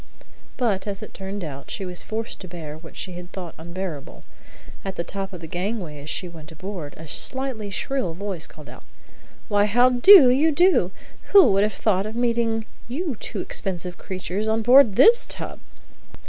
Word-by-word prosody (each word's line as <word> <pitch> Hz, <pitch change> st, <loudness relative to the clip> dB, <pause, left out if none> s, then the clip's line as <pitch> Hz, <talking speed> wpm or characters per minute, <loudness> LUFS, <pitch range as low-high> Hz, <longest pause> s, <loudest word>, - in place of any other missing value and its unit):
But, 210 Hz, -6 st, 0 dB
as 200 Hz, -1 st, -5 dB
it -, -, -10 dB
turned 195 Hz, +1 st, -6 dB
out, 140 Hz, -3 st, -8 dB
she 195 Hz, -, -4 dB
was 180 Hz, -1 st, -4 dB
forced 220 Hz, +1 st, -5 dB
to 185 Hz, -, -9 dB
bear 165 Hz, -4 st, -8 dB
what 160 Hz, +1 st, -13 dB
she 185 Hz, -, -5 dB
had 175 Hz, 0 st, -9 dB
thought 180 Hz, -4 st, -7 dB
unbearable. 170 Hz, -3 st, -7 dB, 0.6 s
At 195 Hz, -1 st, -5 dB
the 170 Hz, -, -2 dB
top 195 Hz, +2 st, -5 dB
of 180 Hz, -3 st, -9 dB
the -, -, -7 dB
gangway 175 Hz, -4 st, -4 dB
as 150 Hz, -, -9 dB
she 180 Hz, -, -3 dB
went 160 Hz, -3 st, -12 dB
on 160 Hz, -, -13 dB
board, 185 Hz, -6 st, -7 dB
a 160 Hz, -, -10 dB
slightly 255 Hz, -, -3 dB
shrill 245 Hz, -3 st, -2 dB
voice 190 Hz, -3 st, -5 dB
called 150 Hz, -2 st, -14 dB
out, -, -, -12 dB, 0.6 s
"Why, 205 Hz, -1 st, +3 dB
how 245 Hz, +4 st, +4 dB
do 255 Hz, +2 st, +9 dB
you 300 Hz, +5 st, +3 dB
do! 345 Hz, -, +4 dB, 0.4 s
Who 395 Hz, -, +8 dB
would 195 Hz, +1 st, +3 dB
ever 210 Hz, -, +1 dB
have -, -, -12 dB
thought 200 Hz, -2 st, +1 dB
of 220 Hz, -, -7 dB
meeting 235 Hz, -2 st, 0 dB, 0.2 s
you 290 Hz, +3 st, -3 dB
two -, -, -5 dB
expensive 180 Hz, -2 st, -4 dB
creatures 190 Hz, +2 st, -4 dB
on 220 Hz, 0 st, +1 dB
board 245 Hz, -3 st, +7 dB
this 470 Hz, -, +6 dB
tub?" -, -, -5 dB
195 Hz, 190 wpm, -23 LUFS, 175-235 Hz, 0.6 s, do